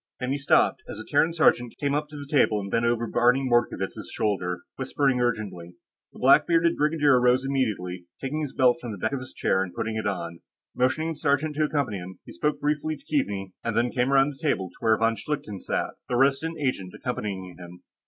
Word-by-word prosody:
Then 125 0 -2
he 140 - -1
stopped, 140 - +3
as - - -6
a 110 - -8
Terran 155 +3 +2
sergeant 125 -7 +2
came 140 -2 0
up 150 +1 -1
to 150 - -9
the 145 - -7
table 135 -7 +2
and 100 -1 -6
bent 115 0 +2
over 120 0 +1
Barney 125 +3 +2
Mordkovitz' 120 -1 0
shoulder, 90 -4 -1
whispering 135 -3 0
urgently. 100 -8 -3 0.4
The - - -16
black - - +5
bearded 170 0 +3
brigadier 150 -4 +3
rose 125 +2 +3
immediately, 100 -10 -2
taking 145 +3 -3
his 145 -3 -3
belt 130 +3 +3
from 120 -6 -5
the - - -7
back 110 +4 -1
of 140 - -1
his 130 0 -9
chair 95 - +1
and 95 -2 -4
putting 110 0 -2
it 110 - -2
on. 85 -4 -4 0.4
Motioning 130 +6 +1
the 165 - -3
sergeant 150 +1 0
to 155 - +3
accompany 140 -9 -1
him, 90 +1 -9
he - - -11
spoke 150 +13 -1
briefly 150 +1 -1
to - - -24
Keaveney 100 -10 -2
and 115 -1 -2
then 120 +1 +2
came 125 +1 0
around 135 +1 +4
the 140 - -15
table 100 - 0
to - - -23
where 110 -1 +3
von 115 +1 +2
Schlichten 110 -4 -4
sat, - - -2 0.2
the 125 - 0
Resident 140 +5 +2
Agent 125 -10 -2
accompanying 95 -7 -5
him. 90 0 -12
125 Hz, 220 wpm, -26 LUFS, 105-145 Hz, 0.4 s, black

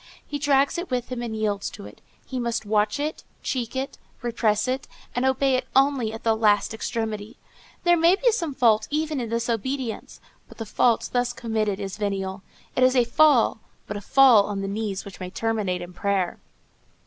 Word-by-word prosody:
He 290 - -4
drags 285 +3 +2
it 355 - -5
with 250 -2 -2
him 250 -2 -4
and 230 -2 -4
yields 210 -2 -1
to - - -11
it. - - -13 0.2
He 260 - -4
must 235 -2 -2
watch 210 +2 +1
it, 300 +2 -3 0.2
check 245 -2 -3
it, 265 +1 -4 0.2
repress 225 -2 +1
it, 260 +1 -2 0.3
and 245 +1 +1
obey 265 +1 +2
it 255 0 0
only 270 -4 +3
at 225 - -8
the 225 -1 +3
last 215 -1 +2
extremity. 220 -2 -4 0.5
There 345 -1 +5
may 340 +2 +5
be 480 +4 +3
some 335 -10 -2
fault 220 -5 +3
even 305 -2 -1
in 235 - -4
this 230 +1 -1
obedience; 240 +1 -3 0.3
but - - -14
the 225 - -5
fault 230 +2 +1
thus 245 0 +1
committed 215 -4 -1
is 195 -2 -5
venial; 195 -2 -3 0.3
it - - +1
is 255 +1 +5
a 250 - +5
fall, 250 -2 +4 0.3
but 210 - -5
a 205 - -5
fall 250 -3 +6
on 200 -1 -3
the 195 - -3
knees 200 -1 -3
which 200 - -10
may 185 - -5
terminate 205 -4 -1
in 175 +1 -10
prayer. 195 -1 -1
230 Hz, 195 wpm, -24 LUFS, 210-265 Hz, 0.5 s, fall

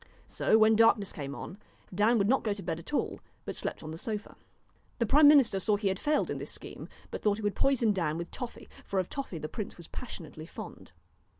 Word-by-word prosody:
So 220 - +3
when 220 0 +6
darkness 220 -3 +4
came 140 -2 -5
on, 195 - -8 0.3
Dan 215 +5 +4
would 200 -2 +2
not 265 +4 +3
go 215 - +1
to 200 - -8
bed 165 -1 -2
at 170 - -11
all, 295 - -1 0.3
but - - -4
slept - - -3
on 155 - -6
the 160 - -7
sofa. 215 0 -4 0.6
The 235 - +1
prime 290 +6 +7
minister 275 -9 +6
saw 210 +2 +2
he 205 -1 0
had 190 0 -2
failed 300 0 +1
in - - -3
this - - -6
scheme, - - -9 0.2
but - - -5
thought 210 -1 +2
he 220 - -7
would 205 -1 +1
poison 240 -4 +2
Dan 165 -5 -1
with 170 0 -5
toffee: 245 -3 -7 0.2
for 200 - -3
of 185 -2 0
toffee 275 - -4
the 155 - -4
prince 210 +5 -6
was 170 - -11
passionately 160 - -8
fond. - - -9
205 Hz, 230 wpm, -30 LUFS, 175-230 Hz, 0.6 s, prime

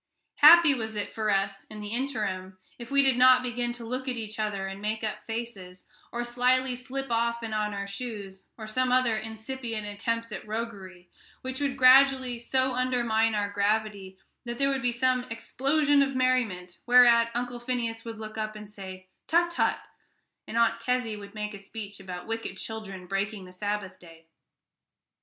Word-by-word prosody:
Happy 325 0 +9
was 220 -4 -4
it 205 - -3
for 215 -1 -1
us, 195 0 0
in 215 - -10
the 210 0 -6
interim, 210 -7 -3 0.2
if 235 - -8
we 280 0 +4
did 265 -2 +3
not 255 0 +7
begin 245 -1 -2
to 240 -1 -8
look 255 +3 -4
at 255 - -1
each 215 -1 -6
other 205 -2 -1
and 195 +1 -6
make 215 +1 -2
up 215 -1 -3
faces, 215 -6 -6 0.3
or 240 0 -2
slyly 250 +1 +1
slip 265 +1 -5
off 235 0 0
and 220 -1 -4
on 210 -1 0
our 200 -1 -4
shoes, 200 -2 -7
or 220 - -7
some 255 +4 0
other 255 -3 +3
incipient 220 +1 -5
attempts 230 +3 -3
at - - -6
roguery, 200 -5 -6 0.3
which 260 0 -5
would 275 -2 -1
gradually 260 -1 +6
so 260 +2 +1
undermine 235 -3 +1
our 205 -1 -1
gravity 205 -2 -1 0.3
that 240 -1 -5
there 275 0 +2
would 270 -1 -1
be 245 -1 +1
some 255 +1 +2
sudden 250 -1 -10
explosion 280 +5 +2
of 275 -1 0
merriment, 230 -9 0
whereat 240 -1 +7
Uncle 245 0 -3
Phineas 235 -2 -3
would 230 -1 -7
look 215 0 -7
up 215 0 -3
and 210 -1 -10
say, 190 -2 -9 0.2
"Tut, 345 +1 +3
tut," 340 - +1 0.7
and 225 - -4
Aunt 235 0 +3
Kezzy 250 -3 -1
would 200 0 -11
make 210 0 -4
a 200 - -8
speech 205 0 -8
about 180 -2 -7
wicked 225 0 -4
children 195 -5 -7
breaking 195 +1 -3
the 180 - -13
Sabbath 205 0 -4
day. 165 -2 -16
225 Hz, 185 wpm, -28 LUFS, 205-250 Hz, 0.7 s, Happy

